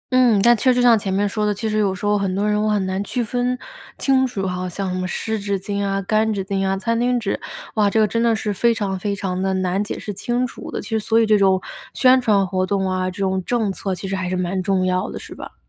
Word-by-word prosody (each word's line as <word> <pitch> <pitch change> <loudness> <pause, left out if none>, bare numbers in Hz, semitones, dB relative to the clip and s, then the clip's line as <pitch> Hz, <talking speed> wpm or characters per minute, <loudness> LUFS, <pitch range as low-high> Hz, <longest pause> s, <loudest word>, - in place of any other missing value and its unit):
嗯， 245 -5 +5
但 240 +1 +6
确 255 +4 +3
实 250 - +1
像 240 -2 +6
前 195 -1 -3
面 200 +2 +1
说 210 +1 -2
的， 210 -1 +1
其 220 +3 -3
实 215 0 0
有 195 -3 +1
时 190 - -6
候 205 0 +3
很 190 -2 -1
多 205 +2 0
人 210 0 +1
我 215 - +1
很 205 -2 +1
难 190 +1 -2
区 240 +4 -2
分 245 +2 -1 0.4
清 265 -1 +2
楚 200 -6 -4
哈， 180 0 -3
像 185 +1 -3
什 - - -2
么 185 - -2
湿 220 +3 -3
纸 200 -1 -2
巾 200 +1 -3
啊、 195 0 0
干 215 +3 +1
纸 195 -3 -2
巾 195 0 -1
啊、 195 0 0
餐 230 +3 -1
巾 245 +1 +2
纸， 220 -4 -2 0.3
哇， 210 -2 +3
这 220 - +1
个 215 - +4
真 230 +3 -1
的 230 -1 +3
是 215 -1 -2
非 235 +4 +2
常 195 -3 -2
非 200 +2 -2
常 185 -2 -3
地 190 0 0
难 185 +1 0
解 205 - -5
释 205 - -6
清 240 +6 -1
楚 250 - -8
的， - - -4
其 - - -10
实 220 -1 0
所 225 +1 +2
以 225 - +4
这 215 -1 +4
种 190 -1 +4 0.4
宣 255 0 +5
传 210 -5 +3
活 185 0 -1
动 195 0 0
啊、 185 0 -1
这 185 - -10
种 190 -1 0
政 220 -2 0
策 190 0 -3
其 195 - -7
实 195 - -2
还 185 -1 -3
是 185 - -1
蛮 185 +1 -1
重 190 0 +1
要 185 +2 0
的， - - -6
是 - - -10
吧？ - - -10
200 Hz, 310 characters per minute, -21 LUFS, 190-225 Hz, 0.4 s, 但